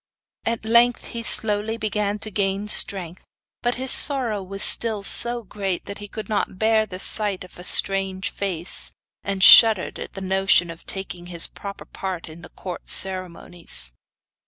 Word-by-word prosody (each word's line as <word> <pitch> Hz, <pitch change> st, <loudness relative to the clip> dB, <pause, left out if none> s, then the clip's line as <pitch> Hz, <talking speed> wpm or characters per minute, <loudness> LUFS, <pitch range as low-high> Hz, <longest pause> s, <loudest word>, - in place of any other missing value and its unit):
At 230 Hz, -1 st, -3 dB
length 235 Hz, +2 st, +2 dB
he 235 Hz, -, -7 dB
slowly 220 Hz, 0 st, -1 dB
began 210 Hz, -2 st, -3 dB
to 215 Hz, -, -8 dB
gain 200 Hz, +1 st, -2 dB
strength, 185 Hz, -4 st, +2 dB, 0.4 s
but 240 Hz, 0 st, -1 dB
his 260 Hz, +1 st, -1 dB
sorrow 245 Hz, -8 st, +3 dB
was 195 Hz, +1 st, -7 dB
still 220 Hz, -3 st, 0 dB
so 240 Hz, +3 st, +4 dB
great 195 Hz, -2 st, -5 dB
that 200 Hz, -, -9 dB
he 205 Hz, -, -9 dB
could 215 Hz, +1 st, -9 dB
not 205 Hz, -3 st, -3 dB
bear 220 Hz, +1 st, +1 dB
the 185 Hz, -2 st, -9 dB
sight 200 Hz, 0 st, 0 dB
of 180 Hz, -, -16 dB
a -, -, -10 dB
strange 195 Hz, 0 st, +3 dB
face, 185 Hz, -3 st, +1 dB, 0.3 s
and 195 Hz, -1 st, -3 dB
shuddered 220 Hz, -4 st, +6 dB
at -, -, -9 dB
the 195 Hz, -, -9 dB
notion 190 Hz, -2 st, +1 dB
of 165 Hz, -, -15 dB
taking 180 Hz, -2 st, -7 dB
his 170 Hz, -2 st, 0 dB
proper 200 Hz, -1 st, -10 dB
part 185 Hz, -4 st, -7 dB
in 160 Hz, +2 st, -13 dB
the 175 Hz, -, -13 dB
court 180 Hz, -2 st, -9 dB
ceremonies. 175 Hz, -, -1 dB
195 Hz, 165 wpm, -21 LUFS, 185-220 Hz, 0.4 s, shuddered